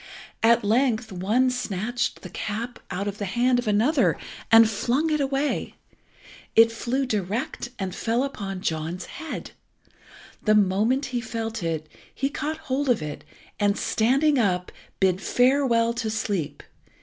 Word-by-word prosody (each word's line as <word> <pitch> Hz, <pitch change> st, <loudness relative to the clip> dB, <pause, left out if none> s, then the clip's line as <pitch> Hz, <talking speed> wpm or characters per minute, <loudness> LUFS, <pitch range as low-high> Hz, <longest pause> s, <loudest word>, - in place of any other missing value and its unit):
At 230 Hz, 0 st, +5 dB
length 230 Hz, +1 st, +1 dB
one 215 Hz, +8 st, +2 dB
snatched 240 Hz, 0 st, -2 dB
the -, -, -7 dB
cap 225 Hz, +3 st, -4 dB
out 195 Hz, +2 st, -3 dB
of 205 Hz, 0 st, -4 dB
the 205 Hz, -, -2 dB
hand 245 Hz, +5 st, +2 dB
of 245 Hz, -, -4 dB
another 225 Hz, +9 st, +3 dB, 0.3 s
and 225 Hz, 0 st, +9 dB
flung 250 Hz, +9 st, 0 dB
it 300 Hz, -, +1 dB
away. 275 Hz, +1 st, -1 dB, 0.8 s
It 230 Hz, 0 st, +7 dB
flew 250 Hz, +4 st, -1 dB
direct, 215 Hz, +2 st, -2 dB
and 190 Hz, -2 st, -3 dB
fell 230 Hz, +5 st, 0 dB
upon 195 Hz, -8 st, -4 dB
John's 165 Hz, +2 st, -3 dB
head. 320 Hz, -, -7 dB, 0.9 s
The 215 Hz, -1 st, +3 dB
moment 210 Hz, +7 st, +2 dB
he 240 Hz, -, 0 dB
felt 225 Hz, -1 st, -4 dB
it 160 Hz, -2 st, -2 dB, 0.3 s
he 275 Hz, -, 0 dB
caught 300 Hz, +2 st, -3 dB
hold 275 Hz, 0 st, -1 dB
of 230 Hz, -10 st, +2 dB
it, 150 Hz, -1 st, -6 dB, 0.4 s
and, 205 Hz, -1 st, +2 dB
standing 270 Hz, +5 st, +2 dB
up, 180 Hz, -5 st, 0 dB, 0.3 s
bid 190 Hz, -1 st, +2 dB
farewell 245 Hz, -2 st, +3 dB
to 235 Hz, -2 st, -2 dB
sleep. 205 Hz, -8 st, -2 dB
225 Hz, 145 wpm, -25 LUFS, 200-255 Hz, 0.9 s, and